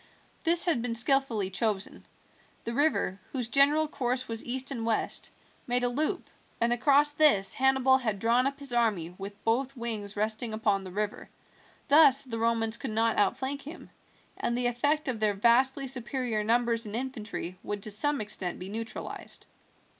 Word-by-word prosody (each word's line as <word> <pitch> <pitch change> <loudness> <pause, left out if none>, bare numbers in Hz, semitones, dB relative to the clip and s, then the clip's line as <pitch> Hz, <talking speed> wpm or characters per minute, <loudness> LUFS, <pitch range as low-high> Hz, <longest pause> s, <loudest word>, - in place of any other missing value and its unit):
This 340 0 +4
had 320 -9 +1
been 235 -1 -2
skillfully 235 -5 +2
chosen. 205 -1 -2 0.6
The 235 - -4
river, 280 -8 +1
whose 250 -4 -3
general 290 +4 +4
course 255 -3 -2
was 225 -1 -3
east 260 +2 -2
and 235 -4 -4
west, 225 -1 -1 0.4
made 245 0 +2
a 245 - +2
loop, 310 +9 -2 0.3
and 235 +1 +2
across 285 +4 +3
this 290 -10 +3
Hannibal 265 0 +3
had 220 -6 -2
drawn 235 +5 +2
up 275 0 -4
his 280 -3 -1
army 205 -8 0
with 200 +1 -9
both 255 +4 0
wings 215 -4 -4
resting 220 +2 -1
upon 205 -3 0
the 185 - -9
river. 210 +2 -4 0.6
Thus 280 -2 +6
the 230 -4 -5
Romans 225 -1 +1
could 265 - -5
not 225 +1 +1
outflank 260 +7 0
him, 305 +5 -11 0.5
and 235 - -1
the 245 - 0
effect 285 +6 0
of 245 -4 -2
their 210 -2 +1
vastly 255 +6 +3
superior 250 -3 -1
numbers 230 0 +1
in 210 - -5
infantry 215 -8 -5
would 205 -1 -5
to 215 - 0
some 285 +5 +1
extent 195 -4 -3
be 185 +1 -8
neutralized. 225 +2 -7
235 Hz, 170 wpm, -28 LUFS, 215-270 Hz, 0.6 s, Thus